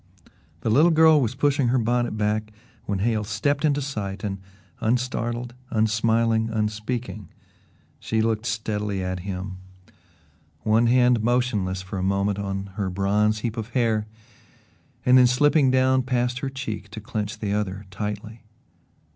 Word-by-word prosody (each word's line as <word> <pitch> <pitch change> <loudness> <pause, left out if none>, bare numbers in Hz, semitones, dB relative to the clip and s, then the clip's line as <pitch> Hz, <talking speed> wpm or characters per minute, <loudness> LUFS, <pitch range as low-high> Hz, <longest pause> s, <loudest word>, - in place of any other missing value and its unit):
The 110 - 0
little 150 +9 +5
girl 160 -2 +6
was 120 0 -1
pushing 140 -1 +2
her 125 +2 +2
bonnet 120 -1 0
back 105 0 -1 0.4
when 100 - 0
Hale 110 -2 +1
stepped 115 +7 -1
into 145 -2 +2
sight 105 -7 -5
and, 100 -2 -3 0.4
unstartled, 120 0 -1 0.2
unsmiling, 110 +1 +2
unspeaking, 110 -1 -3 0.7
she 110 - -1
looked 110 +1 0
steadily 105 -3 -2
at 90 0 -3
him 95 0 -5 1.1
one 110 +2 +3
hand 125 -1 +4
motionless 110 -6 0
for 95 +1 -5
a - - -2
moment 100 +1 0
on 100 -1 -4
her 100 -3 -1
bronze 105 +3 +1
heap 115 0 -3
of 110 0 -4
hair 110 -3 +1 1.0
and 125 +1 +7
then 125 - +7
slipping 145 +3 +4
down 130 0 +3
past 125 -1 -1
her 135 - -3
cheek 120 -6 -6
to 110 +2 -8
clench 105 0 -4
the 105 -2 -2
other 100 -1 -2
tightly. 105 +2 -5
110 Hz, 145 wpm, -24 LUFS, 105-125 Hz, 1.1 s, and